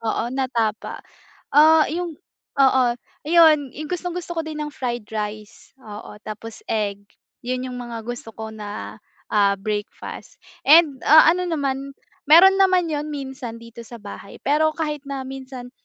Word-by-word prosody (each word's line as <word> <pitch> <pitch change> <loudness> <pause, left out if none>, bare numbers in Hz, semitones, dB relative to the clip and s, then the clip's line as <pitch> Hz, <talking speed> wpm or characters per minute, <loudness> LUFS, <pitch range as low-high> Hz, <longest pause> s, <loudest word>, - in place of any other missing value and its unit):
oo, 230 +1 -2
na 265 -1 -1
tapa, 225 -3 -2 0.5
ah, 315 +1 +7
yung 335 -1 -4 0.4
oo, 265 -1 +5 0.4
ayun, 310 -4 +5
yung 305 +3 -7
gustong-gusto 355 0 -4
ko 325 - 0
din 310 -1 -6
ng 300 0 -5
fried 240 -6 -4
rice, 210 -1 -6
oo, 210 -2 -10
tapos 215 +1 -8
egg, 205 -2 -1 0.4
'yon 255 +1 -3
yung 250 - -6
mga 235 -2 -7
gusto 235 -1 -7
ko 220 0 -7
na, 205 - -7 0.3
ah, 200 -1 +3
breakfast 205 +1 -6 0.3
and, 300 -3 +6
ah, 315 +1 +8
ano 360 0 -1
naman, 275 -3 -2 0.3
meron 380 +6 +7
naman 370 -4 +3
'yon 295 0 -2
minsan 265 -5 -6
dito 230 0 -11
sa 240 - -10
bahay 200 -1 -10
pero 310 +3 +2
kahit 300 -2 -2
na 275 -1 -4
minsan, 260 -2 -8
265 Hz, 150 wpm, -22 LUFS, 225-310 Hz, 0.5 s, ah